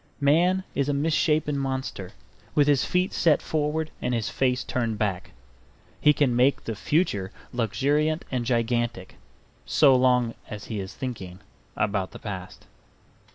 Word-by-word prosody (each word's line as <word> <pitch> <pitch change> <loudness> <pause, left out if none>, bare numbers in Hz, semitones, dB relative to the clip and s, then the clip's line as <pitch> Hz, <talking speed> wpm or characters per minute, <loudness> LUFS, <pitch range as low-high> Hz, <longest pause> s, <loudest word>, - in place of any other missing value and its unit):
Man 175 +7 +3
is 140 0 0
a 145 - +1
misshapen 150 -1 +1
monster, 130 -8 -4 0.4
with 145 -1 +4
his 145 -2 +4
feet 180 +1 0
set 155 -4 +3
forward 155 0 -1
and 125 - 0
his 110 -2 -1
face 130 -1 +1
turned 115 -3 -2
back. 95 -4 -2 0.7
He 150 - +6
can 140 -4 +2
make 130 +3 +3
the 115 - -3
future 105 - 0 0.2
luxuriant 145 +7 0
and 125 -2 -1
gigantic, 120 -4 -1 0.5
so 140 -4 +5
long 125 -2 +3 0.2
as 105 -1 -7
he 110 -3 -4
is 95 0 -6
thinking 100 -8 -6 0.4
about 100 -3 -1
the - - -8
past. 95 -3 -8
130 Hz, 145 wpm, -26 LUFS, 110-150 Hz, 0.7 s, He